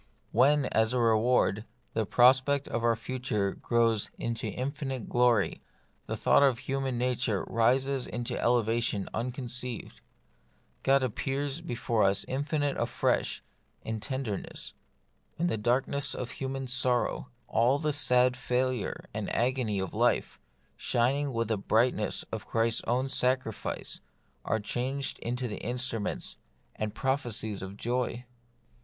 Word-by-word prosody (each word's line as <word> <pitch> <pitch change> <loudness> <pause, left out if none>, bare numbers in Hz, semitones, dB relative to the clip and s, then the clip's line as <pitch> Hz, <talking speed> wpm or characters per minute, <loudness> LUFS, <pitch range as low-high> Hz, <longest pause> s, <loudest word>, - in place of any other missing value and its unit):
When, 140 +4 +4
as 110 +1 +1
reward, 115 -2 +3 0.3
the 110 -2 0
prospect 130 +4 +4
of 115 0 -2
our 115 -1 +4
future 115 -4 -2
grows 115 -3 +1
into 115 -1 -3
infinite 135 -2 -4
glory, 120 -4 +2 0.5
the - - -3
thought - - +4
of 135 -4 +4
human 135 0 -2
nature 125 -4 0
rises 130 +3 +1
into 120 0 -4
an - - -2
elevation 115 -3 +1
unconceived; 125 0 -3 0.8
God 135 0 +4
appears 135 +5 -2
before 120 -7 -1
us 100 0 +2
infinite 145 +1 -1
afresh - - 0 0.4
in 110 0 -3
ten 130 +5 -3
derness; 105 -6 -5 0.6
and 170 - +1
the 170 - 0
darkness 130 +5 +1
of 125 -1 -4
human 135 0 -4
sorrow, 125 0 0 0.2
all 120 +5 +3
the 150 0 0
sad 125 -3 +4
failure 125 -2 -1
and - - -3
agony 120 -4 +1
of 95 -2 -3
life, - - +1 0.4
shining 135 +4 +1
with 115 -2 -1
the 110 -3 0
brightness 115 +5 +1
of - - -5
Christ's 115 0 +1
own 125 +3 +1
sacrifice, 130 -4 -1 0.4
are 110 - +1
changed 130 +6 -2
into 125 +1 -2
the 105 - -5
instruments 120 -2 -3 0.4
and 110 0 -3
prophe 135 -1 0
cies 105 -1 -2
of 95 +1 -7
joy. 125 +1 -2
125 Hz, 130 wpm, -29 LUFS, 115-130 Hz, 0.8 s, When